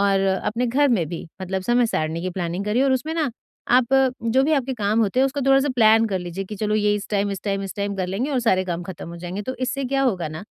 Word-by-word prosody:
और 200 -1 +3
अपने 210 +5 0
घर 280 +5 +3
में 205 -10 +1
भी 170 +1 -6 0.2
मतलब 190 0 -3
समय 240 +2 +3
सारणी 160 -4 -2
की 185 - -2
प्लानिंग 175 +1 -3
करिए 215 +5 +1
और 270 - +3
उसमें 300 +5 -1
ना 315 -5 0 0.5
आप 250 -2 +3 0.4
जो 230 +3 +2
भी 310 - +1
आपके 270 -3 +1
काम 215 0 +1
होते 220 +3 +1
हैं 270 - +5
उसको 270 +1 -3
थोड़ा-सा 270 +1 +4
प्लान 225 -1 +5
कर 190 -2 -1
लीजिए 180 +2 -5
कि 210 - -7
चलो 210 +1 -1
ये 210 -1 +2
इस 205 -1 -5
टाइम, 205 0 0
इस 195 -2 -4
टाइम, 195 -1 -1
इस 195 - -6
टाइम 200 0 -2
कर 185 -1 -1
लेंगे 205 +10 -2
और 265 -3 +1
सारे 190 -5 +2
काम 175 -1 -3
खत्म 175 -2 -8
हो 170 - -8
जाएँगे। 180 +4 -5
तो 260 +5 -4
इससे 270 +2 -2
क्या 270 +1 0
होगा 190 -11 0
ना 155 +1 -7
210 Hz, 275 wpm, -22 LUFS, 190-250 Hz, 0.5 s, हैं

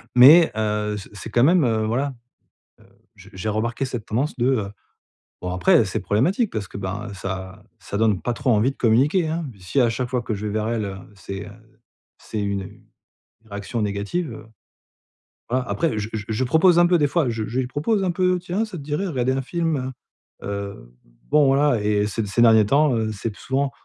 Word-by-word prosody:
mais 150 +7 +8
heu, 105 -1 -1
c'est 100 - -9
c'est 105 +2 -8
quand 120 +2 +3
même, 170 +2 +5
heu, 110 -3 +1
voilà, 135 +5 -1 0.7
heu, - - -21 0.3
je - - -15
j'ai 95 +3 -4
remarqué 115 +5 -1
cette 120 -4 -5
tendance 130 +7 -2
de, 120 - +1
heu, 110 -7 0 0.7
bon 90 0 -4
après, 90 - +4
heu, - - +3
c'est - - -3
problématique, 180 - +1
parce 100 -4 -4
que - - -9
ben 100 +2 -4
ça 95 +1 -6 0.2
ça 100 0 -6
donne 110 -5 +2
pas 120 - -1
trop 125 - -1
envie 110 +3 +3
de - - -28
communiquer 140 - +2
hein. 160 0 -2
Puis 100 -4 -19
si 130 +9 0
à 120 - +4
chaque 125 +2 -3
fois 125 -1 -1
que 115 - -3
je 105 +1 -5
vais 105 - -3
vers 110 +1 -1
elle, 115 -2 -1
heu, 95 - -6 0.2
c'est, 100 0 -7
heu, - - -11 0.7
c'est 110 - -5
une 100 -1 -4 0.7
réaction 100 +3 -4
négative, 105 - -2
heu, 110 0 -11 1.0
voilà 130 +1 0
après, 160 -10 0
je 105 - -3
je 105 -2 -4
je 110 +3 0
propose 165 +7 +4
un 175 - +6
peu 175 -1 +3
des 145 - +3
fois, 155 -2 +1
je 110 -1 -3
je 125 +3 -1
lui 125 - -2
propose 195 - 0
un 180 - +1
peu: 180 0 +1
«Tiens, 185 +5 -2
ça 210 -4 -8
te - - -8
dirait 150 +7 -2
à - - -3
regarder 130 -2 0
un 135 0 -1
film, 165 +2 -1
heu?», 130 0 -4 0.5
heu, 100 -12 -6 0.3
bon 150 -2 +5
voilà 135 -3 +3
et 105 0 +1
ces 105 +1 -3
ces 100 +4 +1
derniers 110 -2 +6
temps, 140 +3 +3
heu, 110 -1 -1
c'est 110 +2 -4
plus 105 - -14
souvent: 135 +1 0
115 Hz, 220 wpm, -22 LUFS, 105-145 Hz, 1.0 s, mais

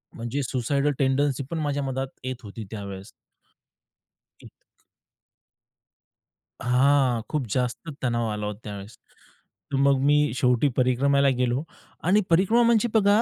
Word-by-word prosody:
म्हणजे 120 +4 -3
suicidal 140 +4 0
tendency 135 0 +1
पण 165 - -2
माझ्या 145 -2 -1
मनात 135 0 -2 0.2
येत 130 0 -3
होती 105 +2 -8
त्यावेळेस, 100 -1 -7 1.3
इतक - - -20 1.8
हां, 125 -1 +3
खूप 150 -5 -1
जास्त 125 +7 -2
तणाव 120 -2 0
आला 105 0 -3
होता 105 0 -5
त्यावेळेस. 100 +1 -8 0.8
मग 140 0 +3
मी 150 -2 +3
शेवटी 125 +1 +2
परिक्रमाला 140 +2 +3
गेलो 125 +3 0 0.4
आणि 195 +5 +4
परिक्रमा 195 +8 +4
म्हणजे 235 0 +3
बघा, 210 0 +4
135 Hz, 120 wpm, -25 LUFS, 120-145 Hz, 1.8 s, आणि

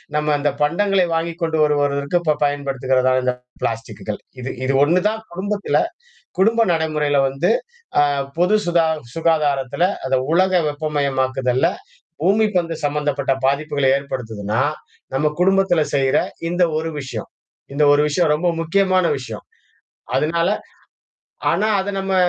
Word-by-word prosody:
நம்ம 150 0 +1
அந்த 145 +1 +1
பண்டங்களை 185 +5 +2
வாங்கிக் 165 +1 -2
கொண்டு 160 -1 0
வரு 150 -1 +3
வருவதற்கு 140 +3 0
இப்ப 155 -3 +1
பயன்படுத்துகிறதான 130 -2 +1
இந்த 125 0 +1 0.3
பிளாஸ்டக்குகள். 110 -2 -4 0.2
இது 125 +1 -5
இது 135 +1 +1
ஒண்ணு 170 +5 +3
தான் 220 +1 -2
குடும்பத்தில, 200 +3 -1 0.6
குடும்ப 225 +4 +4
நடைமுறையில 155 -3 0
வந்து 135 +1 -1 0.6
அ - - 0 0.3
பொது 180 +5 +3
சுதா 170 -2 +2 0.3
சுகாதாரத்தில, 150 -3 +1 0.2
அத 130 0 +2
உலக 185 +3 +3
வெப்பமயமாக்குதல்ல, 140 -2 0 0.6
பூமி 205 +5 +3
பந்து 170 -2 0
சம்மந்தப்பட்ட 145 -2 0
பாதிப்புகளை 140 -1 +1
ஏற்படுத்துதுனா, 115 -5 -3 0.5
நம்ம 140 +3 +1
குடும்பத்தில 190 -2 +3
செய்ற 135 -1 +2 0.3
இந்த 175 +1 +1 0.2
ஒரு 160 +1 -3
விஷயம் 135 - -6 0.5
இந்த 150 - +1
ஒரு 145 - +3
விஷயம் 150 +1 +2
ரொம்ப 170 +4 0
முக்கியமான 185 +1 +2
விஷயம். 115 -5 -8 0.7
அதனால 170 +3 +1 1.0
ஆனா 215 - +1
அத 190 0 -2
நம்ம 195 0 -1
150 Hz, 125 wpm, -20 LUFS, 135-175 Hz, 1.0 s, குடும்ப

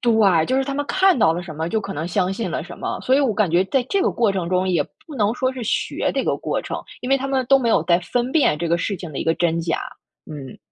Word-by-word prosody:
对， 210 -9 +3
就 260 - +1
是 270 - +1
他 275 - -3
们 290 +1 -1
看 380 +1 +3
到 160 -7 +4
了 175 +2 -4
什 170 -3 -8
么， 160 +2 -3
就 220 +4 0
可 195 -1 -6
能 155 +3 -4
相 185 +1 0
信 225 +4 -3
了 - - -2
什 - - -10
么。 - - -4
所 260 - +2
以 285 - +4
我 265 -5 +2
感 205 -4 +1
觉 175 +3 +3
在 265 +5 +1
这 395 -1 +1
个 - - +2
过 225 -4 +1
程 180 -3 -2
中， 185 0 +1
也 180 -2 +2 0.2
不 305 - -9
能 210 -2 +2
说 260 +1 0
是 255 -2 -6
学 225 - -1
这 - - -1
个 - - +1
过 - - -2
程， - - -5 0.2
因 250 - -5
为 275 - +5
他 275 0 -4
们 265 -1 0
都 275 - +6
没 245 -3 0
有 220 - +3
在 170 0 +4
分 245 +7 -2
辨 285 - +3
这 170 - -2
个 170 - +3
事 195 +4 -2
情 175 -4 -8
的 135 - -5
一 - - -3
个 165 - +2
真 165 -1 0
假， 165 0 -1 0.5
嗯。 140 -4 -8
200 Hz, 330 characters per minute, -21 LUFS, 170-260 Hz, 0.5 s, 都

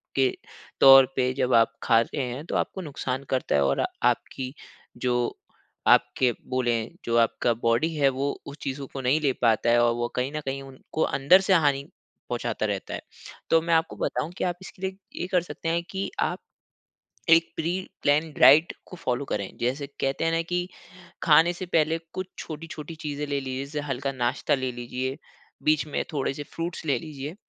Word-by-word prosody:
के 135 -1 +4 0.5
तौर 135 -1 +10
पे 130 -1 +2
जब 130 -1 0
आप 115 0 +5
खा 115 - +5
रहे 140 +5 -3
हैं, 125 +5 -6
तो - - -4
आपको 190 - -1
नुकसान 135 -4 -4
करता 130 -1 0
है। 70 - +4
और 70 0 +1 0.3
आपकी 130 0 -5 0.4
जो 120 -1 0 0.5
आपके 125 -2 +4 0.2
बोलें 120 -3 0 0.2
जो 115 - 0
आपका 115 +1 +2
बॉडी 115 +8 +2
है 140 -2 +4
वो 135 +2 -1
उस 140 +1 -9
चीज़ों 135 +1 -4
को 135 - -4
नहीं 130 +4 +2
ले 140 -2 +2
पाता 115 -1 +3
है 120 0 +5
और 120 0 +3
वो 120 0 -1
कहीं 125 +2 -1
न 155 - -3
कहीं 135 0 -3
उनको 135 +3 -7
अंदर 170 +8 +5
से 190 0 +2
हानि 145 -5 +3 0.5
पहुँचाता - - -2
रहता - - -3
है। - - -4 0.5
तो 165 - +5
मैं 165 +1 0
आपको 160 +1 +2
बताऊँ 155 - -2
कि - - -2
आप 180 -1 0
इसके 185 - -12
लिए, 190 0 -3 0.2
ये 180 - -2
कर 180 -1 +2
सकते 165 -1 -5
हैं 170 +1 0
कि 195 0 -3
आप, - - 0 0.9
एक 165 0 +5
प्री-प्लान 160 -3 0
डाइट 150 +5 +7
को - - -10
फॉलो 125 -2 -2
करें। 100 -6 -4
जैसे 130 +4 -2
कहते 135 +3 -1
हैं 165 - +2
ना, 165 0 +1
कि 175 +1 -2 0.6
खाने 165 +2 +6
से 180 +1 -6
पहले 165 -1 +2
कुछ 185 0 -4
छोटी-छोटी 160 0 -7
चीज़ें 150 0 -3
ले 140 -1 -1
लीजिए, 130 0 -4
जैसे 150 +2 -4
हल्का 135 0 -2
नाश्ता 120 -2 0
ले 130 -2 -1
लीजिए, 125 +2 -4 0.5
बीच 155 0 +2
में 150 - -2
थोड़े 135 -2 -1
से 145 - -5
फ्रूट्स 170 0 -4
ले 140 -4 +2
लीजिए। 145 +1 -7
140 Hz, 190 wpm, -26 LUFS, 130-165 Hz, 0.9 s, तौर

